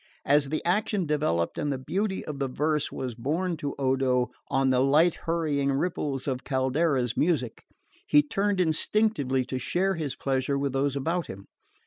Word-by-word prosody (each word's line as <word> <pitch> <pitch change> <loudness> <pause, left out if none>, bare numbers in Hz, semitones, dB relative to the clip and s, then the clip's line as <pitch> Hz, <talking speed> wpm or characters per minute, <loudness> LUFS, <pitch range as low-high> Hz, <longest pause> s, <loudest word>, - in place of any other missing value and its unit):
As 145 0 +3
the 155 - -3
action 200 +1 +1
developed 145 - 0
and 145 - -1
the 135 - -1
beauty 190 +9 -2
of 150 -2 -6
the 135 - 0
verse 150 +3 -1
was 130 -2 -4
borne 160 +10 -1
to 145 -1 -4
Odo 130 -2 +1 0.2
on 135 0 +2
the 125 - +3
light 150 +6 +4 0.2
hurrying 150 -4 +1
ripples 140 -3 -2
of 130 -1 -2
Caldara's 130 -2 0
music 145 -8 0 0.5
he 145 0 +5
turned 200 +5 0
instinctively 155 - +1
to 130 - -3
share 190 +9 0
his 155 -6 -3
pleasure 135 0 -1
with 140 -1 -1
those 140 +1 0
about 165 +5 -1
him. 100 +1 -9
140 Hz, 165 wpm, -27 LUFS, 130-165 Hz, 0.5 s, he